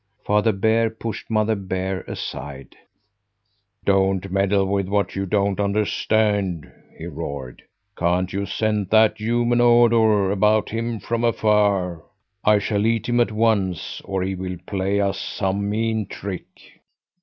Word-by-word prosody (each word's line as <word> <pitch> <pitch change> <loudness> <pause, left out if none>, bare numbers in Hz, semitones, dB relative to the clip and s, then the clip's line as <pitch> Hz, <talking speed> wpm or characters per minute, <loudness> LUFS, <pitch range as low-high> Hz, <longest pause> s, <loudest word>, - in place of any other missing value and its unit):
Father 105 +2 +3
Bear 110 +3 +2
pushed 110 -1 -7
Mother 110 0 +2
Bear 95 -1 -3
aside. 70 0 -7 1.1
"Don't 95 -1 +1
meddle 100 0 +2
with 100 -1 -1
what 100 +1 -1
you 95 0 -2
don't 100 0 0
understand!" 100 -3 0 0.3
he 80 - -8
roared. 70 -6 -6 0.3
"Can't 90 +1 0
you 100 +1 -2
scent 105 -1 -1
that 110 0 +4
human 120 +2 +1
odour 115 -4 +4
about 105 +2 +2
him 115 0 -3
from 115 +4 -2
afar? 105 -6 +2 0.4
I 105 0 +5
shall 105 +1 0
eat 115 -1 0
him 120 0 +1
at 120 - +2
once, 105 -6 0
or 95 -1 -2
he 95 +1 -2
will 90 -1 -5
play 100 +1 -1
us 100 -1 0
some 100 +1 -2
mean 110 -1 -1
trick." 100 -2 -6
100 Hz, 135 wpm, -22 LUFS, 95-110 Hz, 1.1 s, I